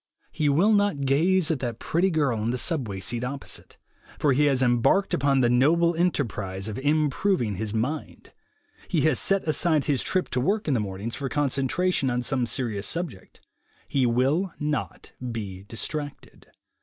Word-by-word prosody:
He 150 -2 0
will 180 +10 +4
not 205 -8 +2
gaze 160 +6 +2
at 155 - -1
that 120 -3 -3
pretty 175 +9 +1
girl 145 -9 +1
on 110 +2 -1
the 125 - -1
subway 120 - -2
seat 115 +5 -2
opposite, 135 +2 -5 0.4
for 145 -3 +2
he 150 +3 +3
has 135 -2 +3
embarked 120 +11 +2
upon 140 -1 +2
the 120 - +4
noble 165 +7 +4
enterprise 115 - -1
of 110 +3 -4
im 150 +1 +2
proving 135 - 0
his 110 +1 -3
mind; 125 +8 -4 0.5
he - - +1
has 155 -5 +2
set 195 -1 +1
aside 155 -1 +2
his 140 -4 +1
trip 185 -1 0
to 125 - -1
work 205 - 0
in 145 - +2
the 125 - +2
mornings 100 +2 -4
for 140 -2 -4
concentration 140 +3 0
on 125 0 -1
some 125 -1 0
serious 110 -6 -2
subject; 165 - -5 0.4
he 130 -3 +1
will 135 +10 +1
not 150 0 -3 0.2
be 100 -4 -6
distracted. 145 +6 -6
140 Hz, 170 wpm, -25 LUFS, 120-160 Hz, 0.5 s, will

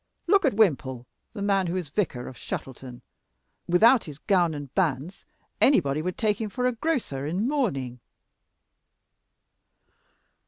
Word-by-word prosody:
Look 400 -4 +4
at 265 - +2
Wimple, 135 - +1 0.3
the 205 -3 -5
man 195 -2 +1
who 170 - -2
is 180 -5 -3
vicar 150 -10 -2
of 130 - -9
Shuttleton 125 0 -7 0.6
without 225 +8 +5
his 150 -3 -9
gown 175 -2 +1
and 145 -3 -8
bands 165 0 -1 0.4
anybody 155 - +4
would 180 +2 -4
take 210 -1 0
him 215 - -2
for 250 +4 -3
a 250 - +3
grocer 230 - -2
in 185 +9 -1
mourning." 140 - -1
180 Hz, 135 wpm, -26 LUFS, 140-220 Hz, 0.6 s, without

